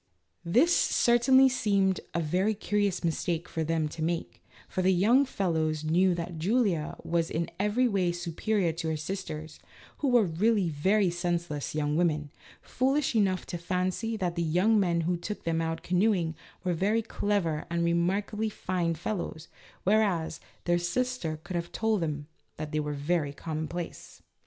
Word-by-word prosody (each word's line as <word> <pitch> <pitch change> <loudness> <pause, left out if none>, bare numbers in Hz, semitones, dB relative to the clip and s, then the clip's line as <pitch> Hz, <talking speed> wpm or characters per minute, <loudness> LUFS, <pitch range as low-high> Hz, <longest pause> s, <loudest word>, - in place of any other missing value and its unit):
This 255 - +4
certainly 260 +3 +5
seemed 200 -7 +2 0.2
a 170 - +1
very 185 +7 +1
curious 205 -2 0
mistake 170 +1 -1
for 160 - -2
them 160 -1 0
to 160 - -8
make, 165 +1 -3 0.2
for 185 - -2
the 185 +1 +4
young 230 +10 +4
fellows 160 - -1
knew 175 +3 +3
that 170 -1 -5
Julia 190 -4 +1
was 165 -1 0
in 165 +1 -2
every 210 +5 +2
way 190 -5 +1
superior 175 +2 -1
to 165 0 -4
her 160 - -1
sisters, 155 -2 -6 0.4
who 290 - 0
were 245 -3 +5
really 190 +2 +2
very 185 +6 +2
senseless 170 -4 -2
young 150 -1 0
women, 155 -4 +1 0.3
foolish 270 +3 +1
enough 190 -4 +2
to 175 - -5
fancy 185 +6 -1
that 180 -4 -1
the 170 - -2
young 180 +7 +3
men 170 -3 +2
who 175 +2 0
took 205 +5 -6
them 165 0 0
out 165 0 -3
canoeing 180 -3 +2 0.3
were 180 -1 0
very 210 +7 +1
clever 200 -8 -1
and 170 0 0
remarkably 195 +6 0
fine 180 -4 -1
fellows, 170 -2 -4 0.3
whereas, 195 -6 +1 0.3
their 175 0 +2
sister 175 -3 -2
could 185 - -6
have 170 0 -3
told 220 -3 0
them 150 -3 -2 0.3
that 155 -1 -5
they 155 - 0
were 150 0 -2
very 145 0 0
commonplace. 160 +3 -6
175 Hz, 160 wpm, -29 LUFS, 165-205 Hz, 0.4 s, certainly